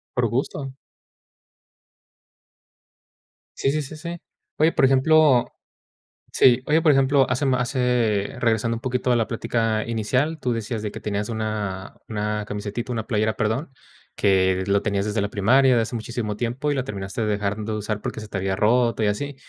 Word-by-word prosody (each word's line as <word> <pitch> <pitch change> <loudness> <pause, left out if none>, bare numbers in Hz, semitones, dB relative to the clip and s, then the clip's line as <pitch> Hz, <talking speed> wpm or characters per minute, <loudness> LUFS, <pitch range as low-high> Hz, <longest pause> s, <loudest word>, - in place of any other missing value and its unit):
Por 120 -2 +2
gusto. 135 +3 -3 2.8
Sí, 135 - +1
sí, 155 +1 -1
sí, 150 +3 -9
sí. 170 +2 -6 0.4
Oye, 160 +2 +4
por - - +2
ejemplo, 135 0 +4 0.9
sí, 125 0 +4
oye, 155 +2 +3
por 155 -3 +5
ejemplo, 135 0 +3
hace 130 +3 0
ma 130 -2 +2
hace, 120 -5 0
regresando 115 0 +1
un - - -8
poquito 125 0 -1
a 120 - +3
la 115 - 0
plática 115 -1 -1
inicial, 125 +8 -1
tú 125 -4 -1
decías 115 -1 -3
de 105 - -4
que - - -9
tenías 105 0 -2
una 105 -4 -4
una 105 -1 -2
camisetita, 105 +4 -4
una 110 -1 -3
playera, 110 -2 0
perdón, 120 +7 -2 0.4
que 95 -1 +2
lo 100 +1 +2
tenías 100 -2 -1
desde 105 0 -1
la 100 - 0
primaria 125 +6 +4
de 115 - +3
hace 110 +1 -4
muchísimo 110 -2 -4
tiempo, 125 +5 -2
y - - 0
la 130 -1 -2
terminaste 100 0 -4
dejando 105 +1 -2
de - - -2
usar, 105 0 -3
porque 110 - -5
se 110 - -10
te 100 - -4
había 95 0 -1
roto 115 +2 +2
y 105 - +3
así. 140 +7 -2
115 Hz, 175 wpm, -23 LUFS, 105-130 Hz, 2.8 s, por